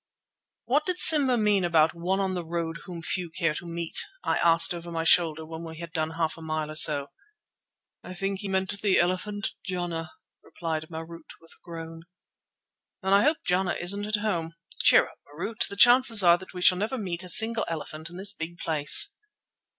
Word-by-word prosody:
"What 285 +8 0
did 365 -1 -2
Simba 280 -8 +5
mean 210 -3 +1
about 160 -2 +2
'one 180 +3 -2
on 190 -1 -2
the 180 -1 -4
road 165 0 -5
whom 175 -3 -9
few 180 +1 -2
care 165 -2 -1
to 175 - -8
meet'?" 170 -1 -1 0.2
I - - -1
asked 165 +2 +4
over 170 0 -9
my 165 -1 -3
shoulder 160 -1 +3
when 160 +1 -9
we 160 -1 -9
had 170 0 -9
done 155 -2 -2
half 160 -1 -2
a - - -12
mile 155 -1 -4
or - - -9
so. 145 -2 +3 0.9
"I 185 - -9
think 195 +1 -3
he 205 - -5
meant 190 0 -2
the 200 -3 +2
elephant 195 +4 -2
Jana," 175 -4 -5 0.3
replied 160 -2 -6
Marût 165 0 -10
with 165 - -20
a - - -17
groan. 165 -1 -9 1.0
"Then 190 +1 0
I 200 - +5
hope 305 +7 0
Jana 180 +1 0
isn't 200 +4 -2
at 215 - 0
home. 165 -6 -3 0.3
Cheer - - +5
up, - - -18
Marût. 180 +9 -4
The 200 - -8
chances 240 -1 +6
are 175 0 +5
that 190 - -11
we 180 -1 -7
shall 180 0 +5
never 220 +6 -3
meet 180 -6 -5
a 180 - -5
single 225 +5 +5
elephant 160 0 -7
in 175 - -12
this 195 +2 -4
big 170 -3 -8
place." 160 - +4
175 Hz, 195 wpm, -26 LUFS, 165-200 Hz, 1.0 s, chances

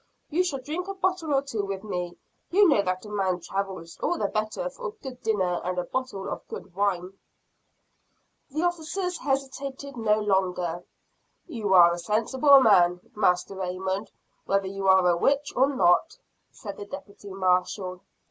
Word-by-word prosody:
You 350 +5 +3
shall 350 -7 -2
drink 310 +8 -5
a 395 - -4
bottle 370 -4 -1
or 275 -1 +3
two 230 -7 -3
with 195 0 -4
me. 180 -4 -4 0.3
You 400 +2 +5
know 280 -11 +4
that 185 +1 -2
a - - -9
man 190 -3 0
travels 190 -2 -5
all 350 - 0
the - - -1
better 215 - -2
for - - -6
a - - -5
good 265 - -10
dinner 185 -5 0
and 180 0 -2
a 180 - 0
bottle 200 -2 -4
of - - -6
good - - -9
wine." 195 -1 -1 1.3
The 310 +4 -2
officers 350 +1 -2
hesitated 275 0 -3
no 215 -2 +2
longer. 180 -4 0 0.6
"You 220 - 0
are 170 -1 +8
a 175 - -4
sensible 250 - +4
man, 180 -5 +4
Master 185 -2 +2
Raymond, 190 +2 -3 0.4
whether 195 0 +1
you 195 0 -3
are 190 -1 +6
a 175 - +4
witch 280 +10 +1
or 265 +2 +4
not," 175 -11 +3 0.3
said 205 -4 -9
the 205 - -7
deputy 205 -4 -10
marshall. 185 0 0
205 Hz, 165 wpm, -26 LUFS, 185-275 Hz, 1.3 s, are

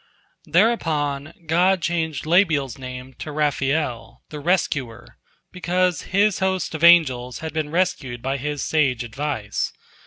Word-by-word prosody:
Thereupon 155 -7 +1
God 175 +3 +2
changed 160 -3 -1
Labbiel's 155 - +2
name 130 0 -8
to 155 - -6
Raphael, 145 -4 -1
the 150 - -7
Rescuer, 145 - -2 0.3
because 180 -2 0
his 205 +1 +2
host 190 -2 -1
of 160 0 -5
angels 130 -8 +5
had 160 - -5
been 155 -2 -2
rescued 150 -8 -1
by 135 +3 -2
his 145 +1 -3
sage 135 -6 +1
advice. 120 -3 -3
150 Hz, 125 wpm, -22 LUFS, 135-175 Hz, 0.3 s, angels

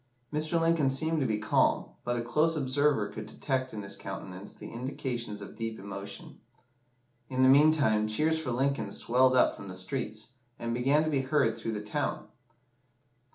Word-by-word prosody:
Mr. 155 +2 +1
Lincoln 165 -4 +3
seemed 160 +4 +1
to 135 - +1
be 110 - 0
calm, 110 - +2
but 120 0 -1
a 120 - -2
close 155 +7 +2
observer 140 -4 +2
could 105 - -7
detect 130 -2 -2
in 105 -2 -6
his 100 - -5
countenance 95 +2 -7
the - - -10
indications 120 -3 -4
of 100 - -9
deep 115 -1 -4
emotion. 100 0 -8 0.9
In 130 -1 +1
the - - +7
meantime, 140 -7 +5
cheers 155 +9 +1
for 155 -5 -4
Lincoln 135 +3 0
swelled 130 +2 +3
up 125 - +4
from 100 - -10
the 95 - -7
streets, 110 +2 -3 0.3
and 115 0 -3
began 135 +5 +3
to 155 - -1
be 140 -2 +2
heard 135 -4 +2
through 115 - -3
the 105 -1 -4
town. 105 -1 -2
130 Hz, 175 wpm, -29 LUFS, 110-145 Hz, 0.9 s, the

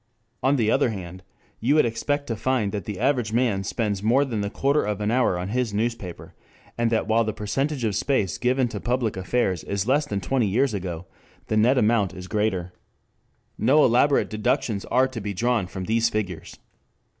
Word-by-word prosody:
On 135 +2 +3
the 115 -4 +2
other 135 -2 +3
hand 95 -3 -7 0.4
you 130 +6 +2
would 155 - +5
expect 145 +5 -1
to 115 - -3
find 115 -3 0
that 100 -3 -4
the 105 -3 -5
average 125 -3 +1
man 115 -5 +1
spends 100 -1 -2
more 125 +7 +3
than 115 -6 -3
the 100 - -2
quarter 140 +7 +1
of 105 -1 -2
an 105 +1 0
hour 125 -7 +2
on 90 +2 -4
his 120 -2 -1
newspaper, 110 -5 -3 0.4
and 120 -1 +1
that 115 -1 0
while 115 +1 +3
the 110 -1 -2
percentage 135 +7 -2
of 110 -2 0
space 105 - 0
given 125 +1 +2
to - - -5
public 120 -3 -1
affairs 95 -1 -1
is 100 0 -2
less 145 +3 +2
than 100 - -2
twenty 120 +4 0
years 120 +5 +1
ago 90 -3 -4 0.4
the 110 - +1
net 120 +5 +4
amount 105 -5 +2
is 90 0 -8
greater. 95 -4 -1 0.9
No 140 +7 +5
elaborate 130 +4 +3
deductions 105 -1 -1
are 130 +2 +3
to 130 -4 -7
be 100 0 -4
drawn 120 -2 +1
from 95 0 -6
these 115 +3 +1
figures. 95 -7 -4
110 Hz, 195 wpm, -24 LUFS, 100-125 Hz, 0.9 s, would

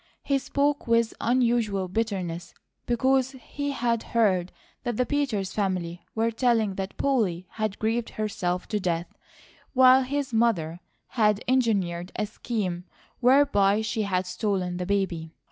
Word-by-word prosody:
He 275 -1 +1
spoke 285 +1 0
with 230 0 +3
unusual 230 -5 +1
bitterness, 180 -4 -3 0.3
because 260 +2 +2
he 285 +2 -5
had 235 -4 0 0.2
heard 185 -5 +3 0.3
that 240 -3 -3
the 250 - +2
Peters 245 -10 -1
family 180 -4 -2
were 225 +1 +1
telling 225 -3 +2
that 190 0 -5
Polly 210 -11 +1
had 215 -2 -2
grieved 225 +1 -1
herself 180 -4 -2
to 210 - 0
death, 175 -3 -2 0.6
while 260 0 +7
his 270 0 -2
mother 180 -8 +1 0.3
had 210 -3 +2
engineered 195 -9 +1
a 210 - 0
scheme 200 -5 -3 0.3
whereby 245 -6 +4
she 220 0 -2
had 190 -3 0
stolen 180 -1 -2
the 180 0 -3
baby. 180 -5 -1
215 Hz, 135 wpm, -26 LUFS, 185-245 Hz, 0.6 s, while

